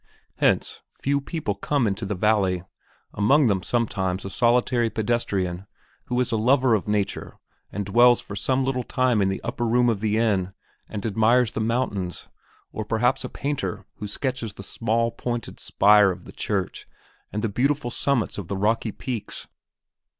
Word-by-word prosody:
Hence, - - +1
few 140 +1 -1
people 150 - -3
come 125 +6 0
into 100 0 -2
the 105 - -2
valley, 95 -3 +2 0.5
among 135 +9 +4
them 100 -5 +2
sometimes 95 -5 -1
a 95 - -5
solitary 120 +1 +2
pedestrian 100 -5 -1 0.4
who 125 0 -1
is 125 -1 +1
a 115 - +1
lover 125 +2 +3
of 105 -2 0
nature 105 -1 -2 0.3
and 100 -1 -3
dwells 120 +4 +5
for 100 - -8
some 130 +6 +1
little 130 -1 0
time 125 -2 +1
in 95 - +2
the 95 - -4
upper 135 -3 -3
room 120 +1 +3
of 105 -4 -1
the 110 0 +1
inn 100 -5 +1 0.4
and 105 -1 -5
admires 115 +3 +3
the 110 - -3
mountains; 110 -6 -2 0.4
or 110 - -4
perhaps 120 +5 +1
a - - -4
painter 140 -8 -3
who 105 - -5
sketches 125 -1 -3
the 100 - -10
small, 115 +3 0
pointed 120 -1 -4
spire 105 0 +5
of 90 -1 -5
the - - -10
church 95 -3 -3 0.4
and 105 +1 -3
the - - +2
beautiful 125 +3 0
summits 125 -7 0
of 95 - -6
the 100 - -3
rocky 110 +2 +1
peaks. 120 0 -5
110 Hz, 170 wpm, -24 LUFS, 100-125 Hz, 0.5 s, dwells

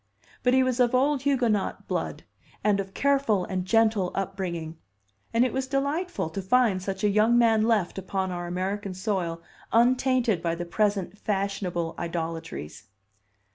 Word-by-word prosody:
But 250 0 +3
he 260 - +5
was 255 -1 0
of 245 0 +3
old 275 +1 +2
Huguenot 245 -8 0
blood, - - -3 0.4
and 205 -2 +3
of 195 0 -5
careful 270 -9 +2
and 185 -1 -3
gentle 220 -3 +2
upbringing; 170 -4 -4 0.5
and 230 +2 +3
it 255 - -2
was 265 0 -1
delightful 285 - -1
to 195 - -4
find 200 -1 +2
such 190 +1 -4
a - - +5
young 215 +4 +4
man 225 -2 +4
left 210 -5 +1
upon 190 0 -2
our 175 -1 -4
American 190 +2 -3
soil 180 -4 -2 0.3
untainted 245 -4 +3
by 170 -1 -1
the 175 +1 -5
present 200 +1 -1
fashionable 195 -4 -2
idolatries. 165 - -5
200 Hz, 150 wpm, -26 LUFS, 180-245 Hz, 0.5 s, he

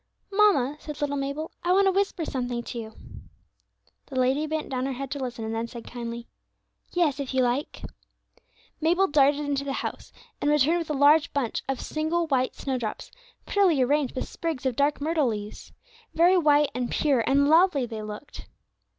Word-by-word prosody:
"Mamma," 385 -10 +3
said 300 -1 -8
little 285 -1 -1
Mabel, 280 +3 -3
"I 350 - +1
want 395 +1 +4
to 385 - +4
whisper 385 -3 0
something 245 -3 -3
to 235 - -6
you." 220 -1 -8 1.1
The 260 -2 -3
lady 265 +5 +1
bent 315 0 -3
down 260 0 -2
her 270 - -2
head 270 +1 -6
to 285 - -3
listen, 245 -4 -4
and 220 - -3
then 225 +1 -2
said 235 0 -10
kindly, 235 -1 -6 0.7
"Yes, 310 -6 +1
if 270 -1 -4
you 260 - +3
like." 245 +4 -2 1.0
Mabel 350 +5 +3
darted 290 -2 +3
into 285 -1 -1
the 275 -1 -3
house, - - -5 0.3
and 290 - +1
returned 300 +3 +3
with 330 - -5
a - - 0
large 290 +2 +4
bunch 265 -6 -1
of 270 - -1
single 315 +2 -1
white 260 -4 0
snowdrops, 250 -6 -4 0.3
prettily 360 -10 +3
arranged 285 +1 0
with 255 - -3
sprigs 320 -6 -4
of 260 -3 0
dark 285 +3 +1
myrtle 310 -2 +1
leaves. 210 -2 -5 0.4
Very 345 +3 +5
white, 295 -4 +4
and 250 -1 -2
pure, 285 -5 +2
and 280 +1 +4
lovely 320 -3 +4
they 225 -2 -6
looked. 210 +6 -9
280 Hz, 185 wpm, -26 LUFS, 250-310 Hz, 1.1 s, Very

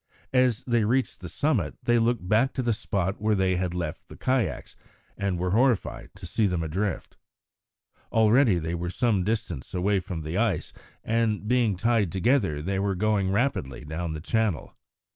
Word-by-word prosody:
As 125 -2 +3
they 120 -3 +1
reached 125 +5 0
the 90 - -7
summit 120 - 0
they 120 0 +3
looked 115 -5 0
back 115 +7 +3
to 130 - -2
the 120 -1 +2
spot 100 -2 -2
where 110 0 +2
they 95 -2 +1
had 90 -1 -2
left 85 -4 -5
the - - -11
kayaks, 130 -2 -1 0.4
and 100 -3 -1
were 90 +1 -1
horrified 120 0 +1
to 95 -1 -10
see 105 +5 +1
them 90 -3 -1
adrift. 95 +6 -3 0.9
Already 110 -1 +4
they 80 0 -3
were 85 0 -3
some 105 -1 +1
distance 100 - -3
away 95 +2 +2
from 85 -3 -6
the 80 +6 -2
ice, 110 -8 0 0.3
and, 110 -2 0
being 120 -5 +2
tied 110 -3 +1
together, 95 - +1
they 95 +3 -1
were 100 -1 0
going 100 0 +1
rapidly 100 - -1
down 80 +2 -4
the 80 - -5
channel. 110 -2 -1
100 Hz, 175 wpm, -26 LUFS, 90-115 Hz, 0.9 s, Already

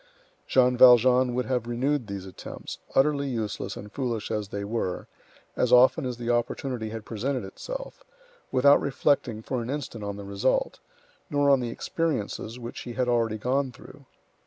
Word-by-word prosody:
Jean 125 -1 +4
Valjean 125 0 +6
would 125 -1 0
have 125 0 -1
renewed 125 +1 0
these 100 -2 -6
attempts, 95 - -8 0.2
utterly 140 0 +3
useless 110 -4 -3
and 105 0 -9
foolish 120 -5 -3
as 105 -1 -2
they 100 +1 -5
were, 100 -4 -3 0.5
as 125 - +1
often 130 +3 +5
as 125 -2 -4
the 120 -1 -6
opportunity 120 -1 -2
had 110 -1 -7
presented 125 +3 -2
itself, - - -7 0.5
without 140 +3 +5
reflecting 135 -5 0
for 125 +1 -2
an 115 - -6
instant 130 -6 -4
on 100 0 -4
the 100 - -7
result, 100 - 0 0.5
nor 145 -2 +3
on 135 - +5
the 120 -2 -3
experiences 120 -5 -3
which 120 -1 -7
he 120 - -7
had 125 +1 0
already 115 -3 +1
gone 130 +4 0
through. - - -15
125 Hz, 165 wpm, -26 LUFS, 110-135 Hz, 0.5 s, Valjean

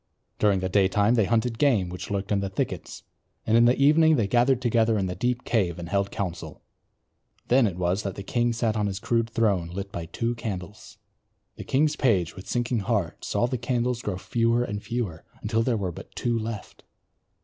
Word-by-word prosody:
During 100 -3 +3
the 95 - 0
daytime 100 +3 +3
they 110 -4 +3
hunted 115 +1 0
game 120 -11 +3
which 90 0 -7
lurked 100 +1 -3
in 100 - +2
the 100 0 -2
thickets; 95 - -4 0.4
in 115 +2 +5
the 120 - +3
evening 155 +3 +5
they 115 -7 +1
gathered 120 +4 +3
together 115 -2 +2
in 95 - 0
the 90 - -3
deep 125 +3 -1
cave 95 -8 0
and 85 -1 -6
held 100 +1 0
council. 90 -4 -5 0.9
Then 125 -1 +5
it 90 -3 -4
was 90 +2 0
that 100 -2 -4
the 100 - -6
king 120 +3 0
sat 115 -1 0
on 105 -1 0
his 95 -1 -4
rude 115 -1 +2
throne 100 -7 +1
lit 100 +3 -6
by 85 -4 -5
two 115 +7 -2
candles. 105 -4 -7 0.6
The - - -7
king's 150 +3 +1
page 95 - +1
with 95 - -10
sinking 120 -1 0
heart 100 - -2
saw - - 0
the 125 0 -2
candles 125 0 -1
grow 100 -6 -3
fewer 115 +4 +1
and 105 -3 -4
fewer 105 -7 -4 0.2
until 110 +1 +1
there 115 0 +1
were 95 -3 -2
but - - -12
two 120 -1 0
left. 115 -2 -5
110 Hz, 200 wpm, -26 LUFS, 95-120 Hz, 0.9 s, in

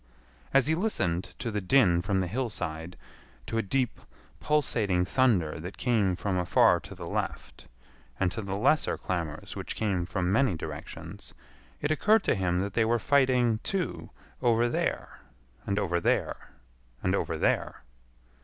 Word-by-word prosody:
As 135 -1 +4
he 155 - +2
listened 95 - -1
to 115 - -3
the 105 -1 -2
din 95 -5 +4
from 95 +1 0
the 90 - -1
hillside, 90 -7 -4 0.5
to 115 - -2
a - - +3
deep 125 +4 -1 0.4
pulsating 110 -11 +1
thunder 90 - +2
that 90 +4 -7
came 105 -7 +2
from 95 0 -1
afar 90 +1 +4
to 95 +4 -11
the 90 -1 -8
left, 65 -5 -4 0.5
and 90 -2 +2
to 110 - -4
the 100 -1 -3
lesser 135 +7 +2
clamors 85 -5 -4
which - - -5
came 95 -5 -1
from 90 -2 -1
many 115 -3 +3
directions, 75 -2 -8 0.5
it 150 - 0
occurred 210 +6 +3
to - - +2
him 90 -1 0
that 100 0 -3
they 115 - +3
were 115 +2 +2
fighting, 125 -3 +3
too, 170 - -3 0.3
over 120 -1 +3
there, 120 - -2 0.5
and 100 - 0
over 90 -4 +1
there, - - 0 0.5
and - - +1
over - - -1
there. - - 0
100 Hz, 155 wpm, -28 LUFS, 90-125 Hz, 0.5 s, As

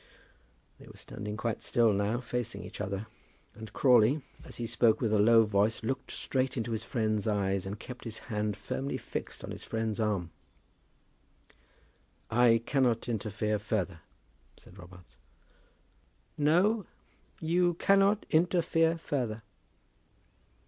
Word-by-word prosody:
They - - -14
were - - -13
standing 105 0 -7
quite 115 -1 -2
still 115 -3 +3
now, 100 +5 0
facing 120 -1 -4
each - - -8
other, 100 +1 -3 0.5
and 110 -1 -10
Crawley, 130 +2 +4 0.2
as - - -10
he 120 - -4
spoke 115 -1 +3
with 110 -3 0
a 105 - +3
low 115 +2 +6
voice, 105 +2 +1
looked 130 +3 -3
straight 130 0 -1
into 115 0 -2
his 110 -1 -2
friend's 110 -2 -1
eyes, 100 -2 0
and 100 +2 -5
kept 125 -1 -9
his 110 -1 -5
hand 105 -3 -3
firmly 140 +1 -3
fixed - - -6
on - - -6
his - - -8
friend's 110 -1 -2
arm. 100 -6 -1 2.0
"I 115 -1 +4
cannot 125 -5 +1
interfere 105 -1 -1
further," 100 -5 -2 0.6
said 95 - -16
Robarts. 90 0 -15 1.2
"No, 180 +8 +2 0.5
you 175 +2 +2
cannot 195 +3 +3
interfere 165 0 +2
further." 120 -9 -3
115 Hz, 130 wpm, -30 LUFS, 105-130 Hz, 2.0 s, low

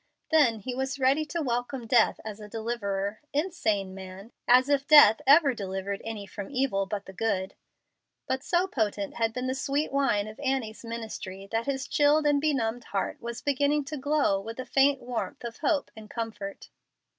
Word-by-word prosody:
Then 250 -9 +4
he 250 +5 -4
was 265 +2 -2
ready 275 +3 +2
to 325 +2 -3
welcome 245 0 -2
death 230 0 +3
as 215 -1 -6
a 210 -1 -10
deliverer. 210 -3 -3
Insane 220 - -1
man! 190 +3 -10 0.2
As 255 +2 +6
if 285 -1 +1
death 295 -6 +8
ever 285 -1 +7
delivered 195 -2 -4
any 220 -3 -5
from 200 0 -8
evil 255 -8 0
but 200 0 -4
the 190 - -10
good! 190 -2 -1 0.7
But 260 +1 -2
so 350 +3 +2
potent 210 - -2
had 225 -1 +1
been 250 +2 -4
the 260 - 0
sweet 280 +2 -1
wine 270 -7 +1
of 215 +3 -10
Annie's 260 -6 -2
ministry 220 -4 -6
that 225 +2 -1
his 275 -1 -2
chilled 295 +1 +3
and 290 -1 +3
benumbed 245 -6 0
heart 195 - -3
was 235 0 -6
beginning 285 +1 +1
to 300 +2 -5
glow 285 -8 +1
with 225 +4 -8
a 255 - -4
faint 275 0 +3
warmth 250 +3 -4
of 235 -1 -6
hope 295 -1 0
and 215 -1 -11
comfort. 215 -4 -6
240 Hz, 180 wpm, -28 LUFS, 210-280 Hz, 0.7 s, death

